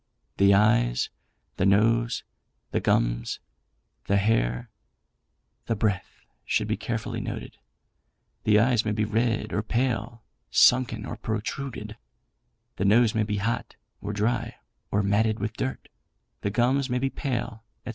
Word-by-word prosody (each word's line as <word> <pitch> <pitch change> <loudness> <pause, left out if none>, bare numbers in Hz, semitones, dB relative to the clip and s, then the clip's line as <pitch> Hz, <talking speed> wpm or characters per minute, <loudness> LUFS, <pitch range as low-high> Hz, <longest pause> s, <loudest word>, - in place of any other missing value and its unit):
The 100 0 +6
eyes, - - +3 0.5
the 95 - +1
nose, 115 +4 +3 0.5
the - - +1
gums, - - 0 0.7
the 100 - +2
hair, 100 - +1 1.0
the 115 - +1
breath, 105 -3 -2 0.2
should - - 0
be - - 0
carefully - - -3
noted. - - -6 0.8
The 105 -1 +4
eyes 115 +1 +3
may 105 - -1
be 105 0 0
red 115 +1 0
or 105 - +1
pale, 115 0 -1 0.3
sunken 120 -4 +4
or - - -6
protruded; 110 0 -4 0.8
the 95 - 0
nose 110 +2 +5
may 110 - +1
be 105 -1 -1
hot, 115 +4 -2 0.3
or 100 - -3
dry, 110 +4 -1 0.3
or 100 0 +1
matted 105 +2 +2
with 105 +2 -3
dirt; 130 +3 -4 0.5
the - - 0
gums 130 +5 +1
may 125 - +1
be 135 +1 0
pale, 120 -4 -3 0.2
&c. - - -5
110 Hz, 135 wpm, -26 LUFS, 105-120 Hz, 1.0 s, The